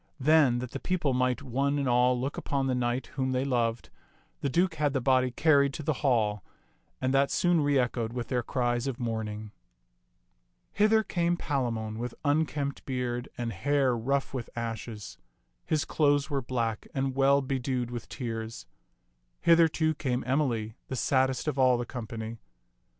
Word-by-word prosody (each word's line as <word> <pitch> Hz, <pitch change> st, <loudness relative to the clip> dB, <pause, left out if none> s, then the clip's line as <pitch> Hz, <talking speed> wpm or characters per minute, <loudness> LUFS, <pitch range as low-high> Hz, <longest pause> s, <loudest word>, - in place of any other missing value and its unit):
Then, 145 Hz, -3 st, +4 dB
that 125 Hz, 0 st, -5 dB
the -, -, -5 dB
people 170 Hz, -7 st, 0 dB
might 125 Hz, +1 st, +1 dB
one 140 Hz, +2 st, 0 dB
and 140 Hz, -2 st, 0 dB
all 125 Hz, 0 st, +3 dB
look 135 Hz, +3 st, -3 dB
upon 140 Hz, -1 st, -1 dB
the 130 Hz, -, +1 dB
knight 125 Hz, +1 st, -1 dB
whom 130 Hz, -1 st, -1 dB
they 130 Hz, +1 st, 0 dB
loved, 120 Hz, -3 st, -1 dB, 0.5 s
the 140 Hz, -, -1 dB
Duke 175 Hz, +5 st, +2 dB
had 145 Hz, -3 st, 0 dB
the 135 Hz, -, +1 dB
body 130 Hz, 0 st, +3 dB
carried 140 Hz, +1 st, +3 dB
to 155 Hz, -, -5 dB
the 155 Hz, -, +1 dB
hall, 110 Hz, -, +1 dB, 0.6 s
and 130 Hz, 0 st, 0 dB
that 140 Hz, +1 st, +3 dB
soon 175 Hz, -2 st, +2 dB
reechoed 125 Hz, -5 st, +1 dB
with 120 Hz, -1 st, -4 dB
their 125 Hz, -2 st, +1 dB
cries 120 Hz, 0 st, -1 dB
of 130 Hz, -3 st, -3 dB
mourning. 110 Hz, -3 st, -4 dB, 1.2 s
Hither 215 Hz, +1 st, +4 dB
came 175 Hz, -3 st, 0 dB
Palamon 115 Hz, -8 st, -2 dB
with 120 Hz, 0 st, -4 dB
unkempt 145 Hz, -1 st, 0 dB
beard 125 Hz, -2 st, -2 dB
and 115 Hz, -2 st, -3 dB
hair 135 Hz, +5 st, +1 dB
rough 135 Hz, +5 st, -1 dB
with 125 Hz, -3 st, -4 dB
ashes. 110 Hz, -5 st, -5 dB, 0.5 s
His 155 Hz, -2 st, +1 dB
clothes 145 Hz, 0 st, +2 dB
were 140 Hz, -1 st, 0 dB
black 115 Hz, -3 st, -2 dB
and 135 Hz, -1 st, -1 dB
well 140 Hz, +1 st, +4 dB
bedewed 130 Hz, -2 st, -2 dB
with 120 Hz, -2 st, -6 dB
tears. 115 Hz, -3 st, -5 dB, 0.8 s
Hither, 165 Hz, 0 st, +6 dB
too, 155 Hz, 0 st, 0 dB
came 130 Hz, -4 st, -2 dB
Emily, 125 Hz, -5 st, 0 dB
the 130 Hz, -, -4 dB
saddest 130 Hz, +2 st, +1 dB
of 145 Hz, -3 st, -1 dB
all 130 Hz, -1 st, +5 dB
the 120 Hz, -, -3 dB
company. 115 Hz, -2 st, -6 dB
130 Hz, 165 wpm, -29 LUFS, 120-140 Hz, 1.2 s, Hither